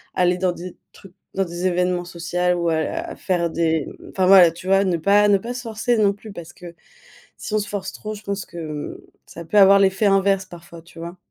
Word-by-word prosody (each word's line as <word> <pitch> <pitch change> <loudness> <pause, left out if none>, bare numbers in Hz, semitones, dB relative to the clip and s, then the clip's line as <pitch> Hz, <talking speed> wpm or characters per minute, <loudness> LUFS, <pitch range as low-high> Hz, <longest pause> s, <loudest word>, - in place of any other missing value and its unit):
aller 180 0 +2
dans 180 -1 0
des 180 +1 -9 0.2
trucs 195 -2 -16 0.2
dans 195 - +1
des 175 +1 -3
événements 180 0 0
social 175 +1 -1
ou 170 -1 0
à 160 -1 +1
la 330 - -4
à - - -8
faire 175 -3 -1
des 160 -2 0 0.3
enfin 185 -1 +1
voilà, 185 -3 +8
tu 175 +3 -11
vois? 195 +1 +3
Ne 185 -2 +1
pas 200 +5 +4
ne 200 - +5
pas 235 +5 -6
se 250 0 -7
forcer 230 +1 -1
non 205 -2 +3
plus. 210 +2 -12
Parce 170 -2 -10
que 175 -1 -12 0.6
si 215 - -6
on - - +3
se 205 - -4
force 195 -2 -5
trop, 215 - -7
je 210 - -11
pense 200 -1 -4
que 170 - -11
hem, 155 -3 -6 0.3
ça 170 - -10
peut 185 - -3
avoir 195 0 +7
l'effet 190 +2 +2
inverse, 195 0 +2
parfois, 170 -1 -13
tu 170 0 -17
vois? 170 +2 -7
185 Hz, 240 wpm, -21 LUFS, 170-200 Hz, 0.6 s, voilà